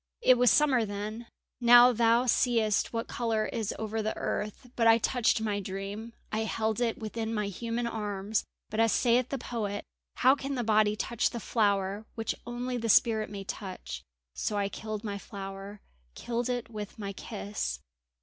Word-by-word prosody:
"It 255 - +7
was 250 -1 +6
summer 255 +2 +4
then; 215 +3 -5 0.3
now 245 +1 +8
thou 230 +1 +4
seest 230 -4 +2
what 230 -1 -3
colour 225 -3 0
is 225 -3 -2
over 220 0 -2
the 215 0 -2
earth. 210 +4 -4
But 230 -1 +3
I 225 0 +8
touched 230 -1 +2
my 210 -2 -1
dream; 200 +4 -6 0.2
I 215 - 0
held 220 +1 -1
it 230 -2 +1
within 225 +1 -3
my 210 -1 0
human 230 +4 -3
arms; 210 -2 -2 0.3
but 215 - -2
as 225 -1 +4
sayeth 245 0 +3
the 275 - -2
poet: 215 -5 -4 0.3
'How 260 +1 +5
can 275 0 -3
the 245 - -1
body 215 -1 +3
touch 235 +2 0
the 235 - -5
flower 205 -1 0
which 225 -1 -1
only 245 +1 -3
the 230 -1 -2
spirit 220 0 +4
may 200 -1 -6
touch,' 185 - -6 0.3
so 210 - -2
I 200 -1 0
killed 215 +1 -5
my 200 -2 -4
flower, 195 0 -8 0.3
killed 240 +1 -2
it 245 -2 -3
with 210 -2 -7
my 200 -2 -5
kiss." 200 - -4
220 Hz, 175 wpm, -29 LUFS, 205-235 Hz, 0.3 s, now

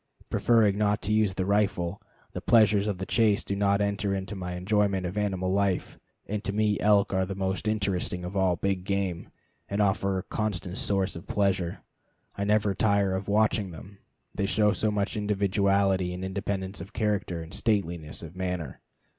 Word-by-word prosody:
Preferring 110 -4 +3
not 105 0 +1
to 105 - 0
use 105 -3 +2
the 95 - -1
rifle, 100 -2 0 0.3
the - - -5
pleasures 105 -3 +4
of 100 -3 -1
the 95 - -4
chase 110 -2 +2
do 100 - -3
not 100 0 +2
enter 100 -1 0
into 95 +2 -5
my 90 -1 -5
enjoyment 100 0 +1
of 90 +2 -4
animal 95 -3 -1
life, 100 -2 0 0.3
and 105 +1 -3
to - - -1
me 105 0 +1
elk 100 -1 +3
are 95 0 +2
the 95 +1 -4
most 95 +1 -2
interesting 95 -4 -1
of 90 +3 -6
all 95 -2 +2
big 95 +1 -1
game, 95 -3 -2 0.4
and 100 - -2
a 100 -2 +4 0.3
constant 100 -4 -2
source 95 -1 0
of 85 - -9
pleasure. 95 -4 0 0.5
I 100 - -2
never 105 -1 +2
tire 100 -2 +2
of 95 +1 -3
watching 105 -1 +2
them, 95 +4 -11 0.3
they 100 -1 -1
show 105 0 +3
so 110 +1 0
much 105 +1 -1
individuality 100 -3 +1
and 90 +1 -5
independence 95 0 -3
of 95 +3 -10
character 105 -5 -1
and 80 +3 -12
stateliness 85 -10 -1
of 85 +1 -9
manner. 90 -7 -4
100 Hz, 180 wpm, -27 LUFS, 95-105 Hz, 0.5 s, pleasures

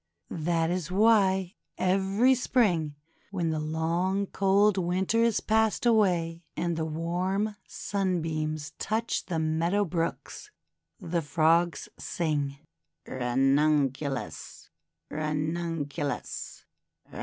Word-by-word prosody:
That 165 -1 +2
is 180 -2 -2
why 190 -2 +3 0.2
every 195 +7 +3
Spring, 195 - +1 0.3
when 175 -5 -1
the 155 - -1
long 165 +5 0
cold 200 +1 +3
Winter 185 +5 +1
is 230 -2 +2
passed 220 +1 +1
away, 175 -7 +2
and 170 -1 0
the 160 0 -1
warm 180 +6 -1
Sunbeams 160 -6 -2
touch 225 +2 -1
the 170 - -2
meadow 165 +6 +1
brooks, 165 -1 -4 0.5
the 170 0 -1
Frogs 165 +2 +2
sing: 145 -4 -2 0.2
— 85 0 -55
"Ranunculus! 135 +2 0 0.4
Ranunculus 155 -1 -3
170 Hz, 95 wpm, -28 LUFS, 155-195 Hz, 0.5 s, why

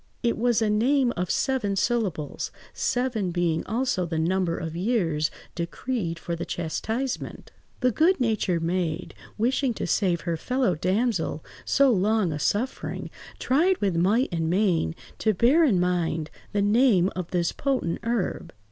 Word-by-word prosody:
It 235 - +2
was 235 0 +2
a 215 - +1
name 245 +3 +2
of 180 0 -2
seven 245 -7 0
syllables, 195 - -1 0.2
seven 245 -6 -1
being 170 -2 0
also 225 -3 0
the 165 -1 -3
number 170 +1 +1
of 165 -1 -5
years 170 -7 +1 0.2
decreed 170 +1 -3
for 170 0 -4
the 170 - -4
chastisement. 220 +11 -3 0.3
The 250 - +3
good–natured 225 - +2
maid, 170 -1 -2 0.2
wishing 245 +2 +1
to - - -3
save 175 -2 +1
her 170 -2 -2
fellow–damsel 190 - 0 0.2
so 275 -2 +4
long 210 -2 +2
a 150 - -4
suffering, 220 - -2 0.3
tried 345 +8 +2
with 195 -4 0
might 205 +10 +2
and 165 -2 -1
main 175 - +1 0.2
to 215 -2 +2
bear 265 - +4
in 225 - +3
mind 170 -3 0 0.2
the 205 -1 +1
name 205 -4 +4
of 180 -2 -4
this 175 -2 0
potent 260 -12 -1
herb. 230 -4 -2
200 Hz, 145 wpm, -26 LUFS, 170-240 Hz, 0.3 s, so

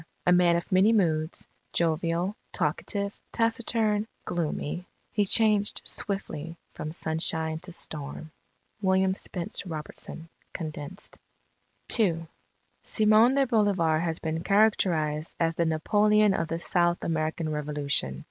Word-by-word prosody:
A 180 - +4
man 175 -1 +5
of 170 +3 -3
many 190 +4 +5
moods, 160 -7 +1 0.3
jovial, 170 +3 0 0.2
talkative, 200 -1 -1 0.2
taciturn, 225 -2 +1 0.2
gloomy, 170 +1 -3 0.2
he 205 - +1
changed 210 0 +3
swiftly 170 -6 -4 0.2
from 155 - -5
sunshine 160 0 -1
to 180 +2 -9
storm. 155 -2 -6 0.5
William 190 -1 +3
Spence 180 -2 -4
Robertson 160 -1 -7 0.3
(Condensed) 155 +2 -7 0.8
II 165 -6 +2 0.6
"Simon 220 +4 +4
de 275 -1 +4
Bolivar 200 -9 +2
has 165 -1 -1
been 160 0 -3
characterized 170 -7 +2
as 165 -1 +2
the 170 - +1
Napoleon 210 +6 +3
of 165 - -1
the 165 - -2
South 175 0 +1
American 160 0 -1
Revolution 145 - -2
170 Hz, 115 wpm, -27 LUFS, 160-205 Hz, 0.8 s, man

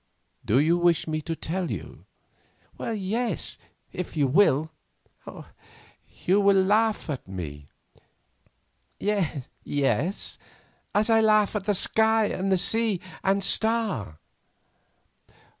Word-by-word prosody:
"Do 110 - +2
you 165 +5 +3
wish 175 -2 +2
me 155 0 -2
to 165 +1 -4
tell 175 +3 -3
you?" - - -7 0.7
"Yes, 225 +2 -2 0.3
if 180 -2 -6
you 145 - +3
will." 155 0 +3 1.5
"You 195 +3 +4
will 200 -1 +4
laugh 210 +3 +2
at 140 - -5
me." 75 -7 -7 1.3
"Yes—as 145 - -2 0.7
I 225 -1 +4
laugh 215 -1 +3
at 200 -2 -2
that 205 -1 +1
sky, 220 +3 +3
and 190 0 0
sea, 220 -1 +1 0.2
and 195 +1 +1
star." 215 - +1
190 Hz, 100 wpm, -26 LUFS, 155-215 Hz, 1.5 s, You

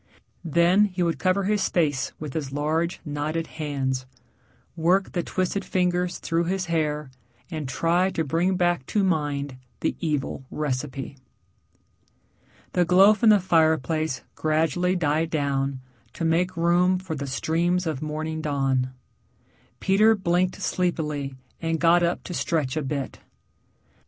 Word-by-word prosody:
Then 170 +5 +4
he 185 -3 -2
would 170 -1 0
cover 185 +1 +2
his 205 +1 +1
face 145 -6 0
with 150 -3 -6
his 145 -4 -3
large, 155 +4 -1
knotted 150 +2 -2
hands, 135 -5 -3 0.7
work 180 +4 +2
the 175 - -1
twisted 185 +3 -2
fingers 180 -1 0
through 165 0 -1
his 190 +1 -1
hair, 150 -4 -1 0.4
and 155 -5 -4
try 170 +7 +2
to 165 - -1
bring 170 +6 +1
back 175 -6 +1
to 210 - +1
mind 145 -6 -1 0.2
the - - 0
evil 150 -5 -2
recipe. 135 -1 -4 1.5
The 180 - +3
glow 190 +4 +6
from 220 +1 +3
the 210 -1 +7
fireplace 160 -4 +1
gradually 160 +4 +1
died 160 -1 +1
down 140 -3 -1 0.3
to 165 - -3
make 175 +2 +1
room 175 +2 +3
for 180 -3 -5
the 140 -2 -4
streams 170 +6 0
of 155 -5 -2
morning 155 +1 -3
dawn. 135 -3 0 0.9
Peter 215 +3 +4
blinked 180 -1 0
sleepily 150 -6 -1 0.3
and 165 -1 -1
got 170 +1 +5
up 170 0 0
to 180 - -6
stretch 155 -6 -1
a 155 - 0
bit. 140 -1 -4
165 Hz, 135 wpm, -25 LUFS, 145-180 Hz, 1.5 s, the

